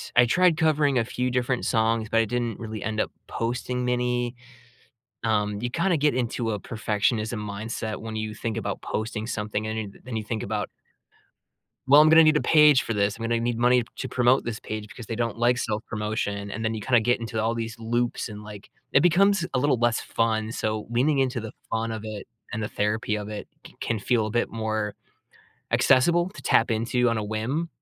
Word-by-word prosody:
I 125 - +7
tried 175 +6 +3
covering 150 -4 +2
a 115 - +2
few 125 +1 -2
different 125 0 0
songs, 115 -1 +1
but 115 - +1
I - - +1
didn't 120 0 -2
really 110 -2 -6
end 110 0 -2
up - - 0 0.2
posting 125 +2 -2
many. 125 0 0 0.9
Um, 105 -2 0
you 120 - -1
kinda 170 +6 +1
get 150 -1 +2
into 120 -2 -1
a 105 - -2
perfectionism 110 0 -1
mindset 110 +1 -4
when 110 0 -6
you 110 0 -3
think 110 0 -4
about - - -3
posting 110 0 -3
something 105 -1 -3
and 110 0 -3
you 105 -2 -4
th - - -19
then 120 -2 -5
you 110 - -3
think 110 -1 -3
about 105 0 -2 1.2
"Well, 145 +2 +8
I'm 155 - +7
gonna 160 +1 +8
need 155 -1 +5
a - - +3
page 150 -3 +6
for 115 - -3
this. 100 0 +1
I'm 115 - -8
gonna 115 0 +1
need 120 0 -1
money 125 +1 +4
to 130 - -4
promote 125 +1 +3
this 115 -2 -4
page 110 -1 -5
because 115 +1 -10
they 115 - -4
don't 115 0 -1
like 120 +1 +3
self-promotion." 105 -2 -3
And 110 +3 -4
then 110 0 0
you 110 - -4
kinda 120 +2 +3
get 120 +2 +2
into 115 -1 -3
all 115 +1 +1
these 115 0 -4
loops 120 +2 -1
and, 105 -1 -8
like 105 -1 -11 0.2
it - - +6
becomes 185 +2 +4
a - - +3
little 130 -1 +2
less 120 -1 +2
fun. 110 -1 -1
So, 110 -2 -2
leaning 135 +5 +2
into 130 -2 +1
the 110 -1 -7 0.2
fun 115 0 -1
of 110 -1 -5
it 110 -2 -6 0.3
and 110 - -3
the 105 - -2
therapy 105 +1 -1
of 105 0 -5
it 105 -1 -6 0.2
c - - -15
can 115 - -1
feel 110 +1 +1
a - - -4
bit 120 +2 0
more 110 -2 -2 0.8
accessible 170 +7 +4
to 210 - -12
tap 115 - +3
into 120 +2 +1
on 115 -1 0
a 105 - -2
whim. 115 +10 -2
115 Hz, 215 wpm, -25 LUFS, 110-125 Hz, 1.2 s, Well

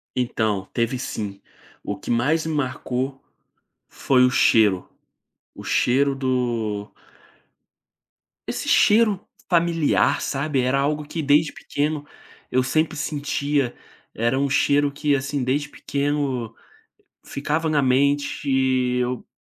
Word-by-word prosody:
Então, 110 -6 -1
teve 120 +2 0
sim. 100 -6 -5 0.4
O - - -4
que - - -10
mais 150 +8 +1
me 160 - -2
marcou 130 -1 -2 0.7
foi 130 -2 +2
o - - +4
cheiro, 105 -6 +3 0.7
o - - -10
cheiro 140 +3 +2
do 120 -6 -2 1.6
Esse - - -4
cheiro 210 -2 +4 0.3
familiar, 170 -3 +2
sabe. 140 -1 -1
Era 130 +2 +1
algo 150 +2 0
que, 160 - -4
desde 145 +1 +3
pequeno, 145 0 -3 0.5
eu 130 0 +2
sempre 155 +4 0
sentia, 145 -3 -1 0.4
era 120 +4 +1
um 140 0 +1
cheiro 145 0 +2
que, 145 0 +1
assim, 140 0 -2
desde 140 +4 -1
pequeno 140 -6 -2 0.7
ficava 155 +3 -2
na 150 -2 +2
mente, 140 +2 +1 0.5
eu 125 0 -2
140 Hz, 115 wpm, -23 LUFS, 125-150 Hz, 1.6 s, o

